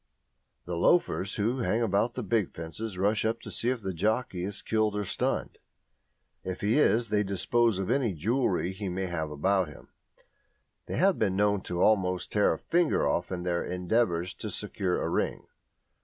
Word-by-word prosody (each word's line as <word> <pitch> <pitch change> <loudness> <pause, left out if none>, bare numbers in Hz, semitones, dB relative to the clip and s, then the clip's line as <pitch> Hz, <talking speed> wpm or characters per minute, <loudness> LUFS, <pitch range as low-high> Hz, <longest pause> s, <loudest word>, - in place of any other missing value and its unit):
The 90 - -3
loafers 100 - +2
who 115 +5 0
hang 115 -1 +1
about 100 +2 +1
the 125 - -3
big 105 -1 0
fences 90 +5 -6
rush 100 +3 +1
up 110 +1 0
to - - -8
see 120 - 0
if 125 -4 -2
the 95 - -2
jockey 105 0 -1
is 100 +2 -4
killed 110 -1 +1
or 105 0 -1
stunned; - - -2 0.8
if 95 -1 -5
he 110 +8 +2
is, 115 -5 +3
they 105 -1 +2
dispose 105 +3 +1
of 95 +3 -2
any 125 -6 +1
jewellery 95 - 0
he 95 0 -5
may 95 +2 -2
have 85 -4 -3
about 95 +5 +1
him; 75 - -13 1.0
they - - -3
have 190 +3 +3
been 95 -3 +1
known 100 0 +2
almost 90 0 +1
to 105 - 0
tear 105 - +5
a - - -4
finger 170 - +1
off 85 +6 -1
in 90 -1 -3
their 85 -1 0
endeavours 90 -1 0
to - - -6
secure 90 -2 -2
a - - -1
ring. - - -1
100 Hz, 185 wpm, -28 LUFS, 90-115 Hz, 1.0 s, tear